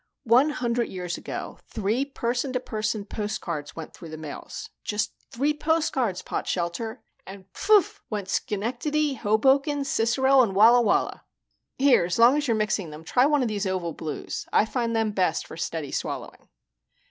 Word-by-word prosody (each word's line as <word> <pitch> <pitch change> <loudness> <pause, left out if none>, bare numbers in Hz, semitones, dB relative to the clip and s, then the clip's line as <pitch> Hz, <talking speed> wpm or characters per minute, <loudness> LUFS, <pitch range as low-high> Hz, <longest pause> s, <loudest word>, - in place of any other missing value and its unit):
One 250 +6 +5
hundred 240 -4 0
years 180 -2 -4
ago, - - -6
three 220 +6 -1
person 255 -1 -2
to 250 - +1
person 215 -3 -3
postcards 195 -9 -4
went 160 -1 -8
through 165 - -11
the 155 - -7
mails 155 -2 -8
just 210 +1 -1 0.2
three 280 +5 0
postcards, 295 - 0
Potshelter! 190 +7 -3 0.2
and 190 0 -10
pft 415 0 +3
went 205 -3 -3
Schenectady, 270 +10 -1
Hoboken, 270 +6 +2
Cicero, 265 +2 +3
and 205 -6 +1
Walla 230 +4 +7
Walla. 220 - +1 0.5
Here, 270 -8 +5
as 175 - -2
long 235 +4 +7
as 295 -1 0
you're 230 -2 +2
mixing 210 -5 -1
them, 155 +1 -10
try 250 - +3
one 295 -3 +2
of - - 0
these 205 -2 -2
oval 180 -3 -2
blues 155 -1 -5
I - - +4
find 230 0 -1
them 225 -1 +1
best 185 -5 0
for - - -10
steady 160 -3 -4
swallowing." - - -5
225 Hz, 160 wpm, -26 LUFS, 190-265 Hz, 0.5 s, Walla